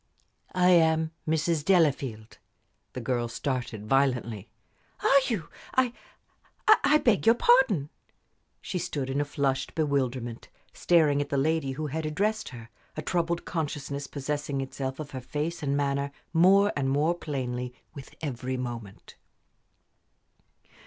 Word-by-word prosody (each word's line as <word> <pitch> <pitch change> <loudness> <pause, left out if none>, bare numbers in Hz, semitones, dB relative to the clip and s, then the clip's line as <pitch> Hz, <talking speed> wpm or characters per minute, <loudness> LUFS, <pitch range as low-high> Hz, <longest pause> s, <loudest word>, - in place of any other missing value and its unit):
"I 180 0 +4
am 160 -2 +4 0.2
Mrs. 160 0 +1
Delafield." 140 - +1 0.5
The 125 - -5
girl 120 0 -1
started 120 -3 -3
violently. 120 -5 0 0.5
"Are 275 - +6
you? 215 -10 -2 0.3
I 255 -2 +3 0.7
I 365 -8 +6
beg 225 -7 +2
your 230 - +7
pardon!" 235 - +3 0.7
She 185 - -3
stood 145 -6 -3
in 140 +2 0
a - - -1
flushed 135 -2 -1
bewilderment, 130 -6 -1 0.2
staring 155 -5 +3
at 145 - -4
the 140 - 0
lady 145 -1 +1
who 155 +3 -4
had 155 +2 -3
addressed 210 +8 -1
her, 115 -2 -11 0.3
a 155 - -3
troubled 170 +1 -1
consciousness 145 -3 -3
possessing 145 0 -3
itself 135 0 -4
of 150 -2 -6
her 130 - -5
face 155 +6 -3
and 140 -1 0
manner 140 0 0 0.2
more 195 +4 +5
and 135 -2 0
more 150 +5 +2
plainly 125 -6 -4 0.2
with 140 -3 -11
every 130 -2 -3
moment. 120 -5 -7
145 Hz, 130 wpm, -28 LUFS, 130-165 Hz, 0.7 s, your